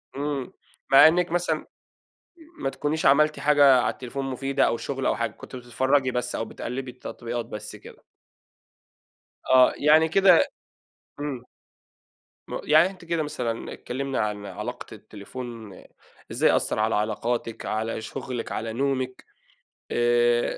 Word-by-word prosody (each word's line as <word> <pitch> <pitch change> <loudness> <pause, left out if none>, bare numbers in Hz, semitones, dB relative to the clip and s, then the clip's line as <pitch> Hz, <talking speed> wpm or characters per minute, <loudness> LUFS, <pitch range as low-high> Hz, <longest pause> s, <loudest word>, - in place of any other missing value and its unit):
إمم 140 -2 -3 0.4
مع 135 +3 +9
إنك 175 +1 +2
مثلًا 170 -3 -1 0.9
ما 135 - -2
تكونيش 150 +3 -2
عملتِ 150 +2 +4
حاجة 140 -3 +5
على 110 - 0
التليفون 135 +2 -6
مفيدة 135 +1 0
أو - - 0
شغل - - -4
أو - - +1
حاجة - - -1
كنتِ - - -11
بتتفرجي 130 +2 +1
بس 125 0 -3
أو - - -2
بتقلبي 125 +3 -6
التطبيقات 120 -1 -6
بس 105 -1 -8
كده. - - -15 1.5
آه 130 -1 +6
يعني 155 +2 +5
كده 185 0 +5 0.8
إمم. 140 -4 -4 1.0
م - - -4
يعني 155 +4 +5
أنتِ 185 -3 -13
كده 165 -1 -1
مثلًا 120 -6 -4
اتكلمنا 135 +1 -4
عن 105 -1 -2
علاقة 105 +5 -6
التليفون 110 0 -9 0.6
إزاي - - +3
أثّر - - 0
على 110 +1 +1
علاقاتِك، 115 +2 -2
على 110 +1 -2
شغلِك، 120 +2 -6
على 110 0 -4
نومِك 130 0 -2 0.7
آآ، 120 0 +3
130 Hz, 130 wpm, -25 LUFS, 115-145 Hz, 1.5 s, مع